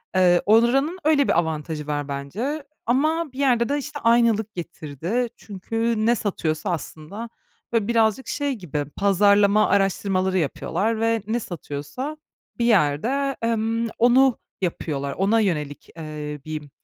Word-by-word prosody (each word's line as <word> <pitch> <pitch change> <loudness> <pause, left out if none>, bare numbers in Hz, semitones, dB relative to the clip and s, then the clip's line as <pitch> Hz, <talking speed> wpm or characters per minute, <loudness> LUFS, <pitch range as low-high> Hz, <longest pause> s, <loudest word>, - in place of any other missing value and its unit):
Eee, 175 -1 +5
oranın 260 - +3
öyle 295 -3 +3
bir - - +3
avantajı 155 -2 -3
var 145 -1 -2
bence. 195 - -4 0.2
Ama 305 +5 +1
bir 265 - -9
yerde 245 -4 +2
de, 285 - +1
işte, 290 +1 -5
aynılık 230 -2 +3
getirdi 175 - -3
çünkü 225 +2 -2
ne 240 +1 +4
satıyorsa 170 -4 -2
aslında, 170 - -6 0.4
böyle, 225 -3 +1
birazcık 230 +1 +2
şey 285 -2 -1
gibi 155 - -4
pazarlama 200 +1 +4
araştırmaları 195 -1 +1
yapıyorlar 190 +7 -1
ve 225 -1 +1
ne 230 +2 0
satıyorsa 175 - -6 0.4
bir 235 - +1
yerde, 235 - +2
emm, 230 0 0
onu 250 +2 +5 0.2
yapıyorlar, 140 -5 -2
ona 205 +4 +2
yönelik, 150 -9 -2
eee, 150 -2 -6
bir, 155 -2 -6
210 Hz, 130 wpm, -23 LUFS, 160-235 Hz, 0.4 s, Eee